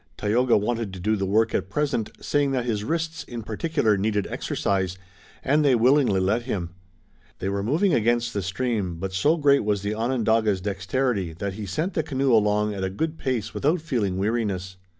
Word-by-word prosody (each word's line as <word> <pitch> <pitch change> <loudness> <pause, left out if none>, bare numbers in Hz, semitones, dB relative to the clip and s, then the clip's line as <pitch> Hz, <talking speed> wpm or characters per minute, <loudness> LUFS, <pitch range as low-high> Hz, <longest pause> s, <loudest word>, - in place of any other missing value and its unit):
Tayoga 120 +4 +2
wanted 115 0 -1
to 95 - -7
do 110 +5 +1
the 95 -2 -2
work 110 +3 +2
at 95 0 -1
present, 135 -2 -1
saying 145 -1 +1
that 125 -2 0
his 110 -4 -1
wrists, 160 +5 -2
in 120 -2 -7
particular, 110 0 0
needed 105 0 0
exercise, 95 -2 -1 0.5
and 150 +3 +3
they 135 -3 +4
willingly 125 -3 +4
let 100 +6 +1
him. 95 -8 -3 0.7
They 95 - -3
were 100 0 -1
moving 160 - +2
against 120 +1 +1
the 100 - -1
stream, 100 -2 -2
but 95 +3 -5
so 150 - +2
great 140 -4 +4
was 105 -1 0
the 100 +1 -1
Onondaga's 110 -3 +1
dexterity 100 0 -1
that 95 +4 -4
he 105 +1 -6
sent 155 - -2
the 160 - +1
canoe 135 -3 0
along 105 -1 +3
at 95 -1 -4
a 95 - 0
good 160 +12 -3
pace 125 -5 -2
without 155 +5 +1
feeling 115 - -1
weariness. 100 -3 -1
110 Hz, 190 wpm, -25 LUFS, 100-130 Hz, 0.7 s, they